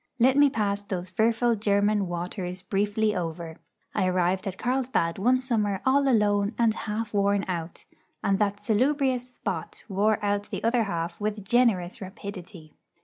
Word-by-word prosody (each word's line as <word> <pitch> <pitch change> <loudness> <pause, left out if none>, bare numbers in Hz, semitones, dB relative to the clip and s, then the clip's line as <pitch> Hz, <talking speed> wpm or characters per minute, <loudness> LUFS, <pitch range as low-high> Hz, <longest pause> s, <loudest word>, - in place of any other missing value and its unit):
Let 255 +2 +4
me 285 0 +6
pass 205 -4 -1
those 185 -2 -5
fearful 230 +4 +2
German 205 -1 +2
waters 180 +1 -4
briefly 205 +2 0
over. 165 -2 -4 0.4
I 185 - +1
arrived 185 +2 +1
at 190 -1 -4
Carlsbad 245 -9 0
one 250 +5 +3
summer 215 -6 0
all 275 +1 +3
alone 210 -3 +2
and 230 -2 +3
half 215 0 -4
worn 200 0 +2
out; 170 -2 -5 0.4
and 195 0 +2
that 205 -1 0
salubrious 255 +2 +1
spot 195 -9 -5
wore 210 +1 +2
out 205 0 -1
the - - -5
other 230 0 +2
half 170 -1 -4
with 210 -1 -3
generous 210 -8 +2
rapidity. 190 -4 -9
205 Hz, 150 wpm, -26 LUFS, 185-230 Hz, 0.4 s, me